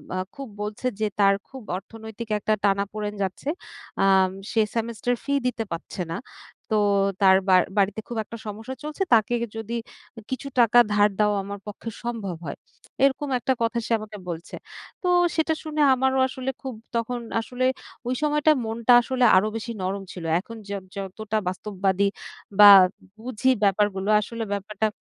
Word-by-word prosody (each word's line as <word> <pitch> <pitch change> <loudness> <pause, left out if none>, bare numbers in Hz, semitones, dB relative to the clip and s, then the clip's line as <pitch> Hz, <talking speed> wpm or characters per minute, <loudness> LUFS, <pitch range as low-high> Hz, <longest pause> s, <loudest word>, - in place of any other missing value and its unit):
আ - - -1 0.2
খুব 275 -2 -7
বলছে 210 +4 -3
যে 215 - +1
তার 200 -1 +6
খুব 265 -2 -10 0.2
অর্থনৈতিক 220 +3 -9
একটা 215 +1 +1
টানাপোড়েন 205 +1 0
যাচ্ছে। 190 +9 -4 0.5
আম 190 -1 +4 0.2
সে 225 - +3
সেমিস্টার 235 +1 -1
ফি 280 - -1
দিতে 245 -2 -2
পারছে 170 +2 -5
না - - -3 0.6
তো - - +4 0.4
তার 190 -1 +7
বা 185 - +7 0.2
বাড়িতে 200 +1 +2
খুব 240 - -5
একটা 230 +2 -9
সমস্যা 220 +5 -6
চলছে 305 +5 -2
তাকে 225 +1 +4 0.2
যদি 225 +1 -4 0.6
কিছু 260 +2 -3
টাকা 235 0 +6
ধার 205 0 +5
দেওয়া 210 -1 +3
আমার 200 0 -6
পক্ষে 210 +2 -6
সম্ভব 220 -7 -3
হয় 140 - -5 0.5
এরকম 275 +1 +2
একটা 260 - +1
কথা 230 +1 0
সে - - -7
আমাকে 215 -1 -8
বলছে। 170 0 -6 0.5
তো - - 0 0.3
সেটা 320 0 +2
শুনে 310 -1 -2
আমারও 265 +1 +1
আসলে 260 0 -4
খুব 265 -2 -5 0.2
তখন 235 +1 -1 0.2
আসলে 250 +2 -2 0.4
ওই 250 - 0
সময়টা 300 +1 +3
মনটা 230 +2 +2
আসলে 255 +1 -1
আরো 210 +3 +3
বেশি 225 +1 -4
নরম 195 +1 -2
ছিল 175 - -8 0.2
এখন 230 +5 -10
যত 200 -2 -4
যতটা 205 +3 -4
বাস্তববাদী 195 +1 0 0.5
বা 205 - +11 0.5
বুঝি 255 +1 0
ব্যাপারগুলো 200 0 +1
আসলে 230 +2 -5
ব্যাপারটা 205 +2 -1
220 Hz, 160 wpm, -24 LUFS, 200-245 Hz, 0.6 s, বা